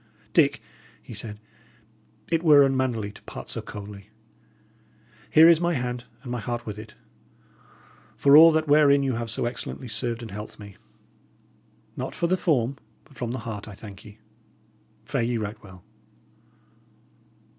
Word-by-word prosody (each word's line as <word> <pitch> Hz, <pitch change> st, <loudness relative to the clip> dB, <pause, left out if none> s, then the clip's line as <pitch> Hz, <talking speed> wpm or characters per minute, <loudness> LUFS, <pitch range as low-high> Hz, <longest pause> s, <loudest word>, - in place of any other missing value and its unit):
"Dick," -, -, +3 dB, 0.4 s
he -, -, -10 dB
said, 105 Hz, 0 st, -6 dB, 0.9 s
"it 165 Hz, -1 st, +2 dB
were 150 Hz, -4 st, +7 dB
unmannerly 130 Hz, -6 st, 0 dB
to -, -, -15 dB
part -, -, -9 dB
so -, -, -3 dB
coldly. 100 Hz, -1 st, -10 dB, 1.2 s
Here 160 Hz, +1 st, +7 dB
is 170 Hz, -1 st, +6 dB
my 170 Hz, -1 st, +1 dB
hand, 125 Hz, -1 st, -3 dB, 0.2 s
and 125 Hz, -, -7 dB
my 125 Hz, -, -2 dB
heart 120 Hz, +1 st, -4 dB
with 105 Hz, -1 st, -6 dB
it. 110 Hz, -1 st, -11 dB, 1.2 s
For 140 Hz, 0 st, +6 dB
all 165 Hz, +2 st, +10 dB
that 155 Hz, 0 st, +1 dB
wherein 145 Hz, -1 st, +5 dB
you 135 Hz, -1 st, 0 dB
have 115 Hz, 0 st, -4 dB
so 115 Hz, -, -2 dB
excellently 125 Hz, +2 st, -5 dB
served 120 Hz, 0 st, -3 dB
and 110 Hz, -, -8 dB
helped 105 Hz, +2 st, -8 dB
me 100 Hz, -2 st, -12 dB, 1.2 s
not -, -, -5 dB
for -, -, -1 dB
the 180 Hz, +2 st, +2 dB
form, 140 Hz, -7 st, 0 dB, 0.3 s
but 145 Hz, -, -21 dB
from 120 Hz, -1 st, -4 dB
the 125 Hz, -, -3 dB
heart, 105 Hz, -2 st, -6 dB
I 105 Hz, -, -9 dB
thank 100 Hz, -2 st, -11 dB
you. 105 Hz, -1 st, -13 dB, 0.9 s
Fare -, -, -1 dB
ye 120 Hz, 0 st, 0 dB
right 105 Hz, 0 st, -5 dB
well." 90 Hz, -3 st, -14 dB
120 Hz, 155 wpm, -25 LUFS, 105-140 Hz, 1.2 s, all